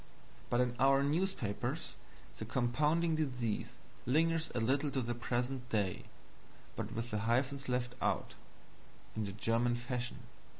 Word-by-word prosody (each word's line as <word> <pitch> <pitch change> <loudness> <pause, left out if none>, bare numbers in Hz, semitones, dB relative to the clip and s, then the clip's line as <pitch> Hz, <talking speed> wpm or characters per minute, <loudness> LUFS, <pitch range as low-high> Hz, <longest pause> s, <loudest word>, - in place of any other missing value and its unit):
But 120 - +3
in 125 -1 +1
our 135 +1 +5
newspapers 145 - -1 0.5
the - - -3
compounding 150 +7 +2
disease 125 -8 -1 0.3
lingers 165 +4 +3
a - - +2
little 135 +6 +2
to 135 - 0
the 120 +1 -1
present 125 +1 -2
day, 100 -5 0 0.7
but - - -3
with 115 +1 -3
the 105 - 0
hyphens 130 +5 +1
left 125 0 0
out, - - 0 0.8
in 110 -1 -1
the 100 - -3
German 115 +4 +1
fashion. 125 0 -3
125 Hz, 135 wpm, -35 LUFS, 120-140 Hz, 0.8 s, our